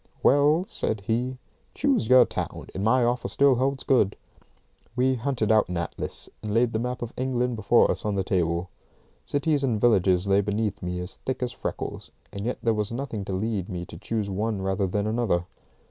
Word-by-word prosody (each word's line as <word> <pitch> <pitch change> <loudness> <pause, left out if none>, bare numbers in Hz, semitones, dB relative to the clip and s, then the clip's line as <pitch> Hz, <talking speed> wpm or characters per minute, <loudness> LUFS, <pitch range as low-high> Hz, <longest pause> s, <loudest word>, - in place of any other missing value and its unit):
"Well," 145 +5 +4
said 110 -2 -2
he, 120 +5 -1 0.4
"choose 275 -6 +1
your 130 -1 +7
town, - - -5
and 95 - -3
my 125 +4 +4
offer 120 +1 0
still 140 -1 +4
holds 135 +2 0
good." 105 -7 +3 0.8
We 130 +1 +3
hunted 120 -3 0
out 110 -3 +4
an 90 - -2
atlas, 85 - -4
and 105 -1 -4
laid 115 0 +3
the 110 - 0
map 125 +1 -3
of 120 - -6
England 125 -1 -1
before 110 +2 +4
us - - -4
on 105 -1 -1
the 95 - 0
table. 85 -1 0 0.5
Cities 145 0 0
and 120 -5 +1
villages 95 -5 +3
lay 100 0 +3
beneath 105 +1 -2
me 90 0 -3
as 90 +1 -7
thick 130 -1 -3
as 125 - -1
freckles, - - -5 0.2
and 100 +3 -4
yet 125 - -1
there 115 - +3
was 105 0 -2
nothing 120 -4 -4
to 95 - -4
lead 100 -1 -2
me 90 -1 -4
to - - -11
choose 110 -3 -2
one 100 +1 -2
rather 95 0 0
than 100 +3 -1
another. 110 -6 0
110 Hz, 195 wpm, -26 LUFS, 100-125 Hz, 0.8 s, your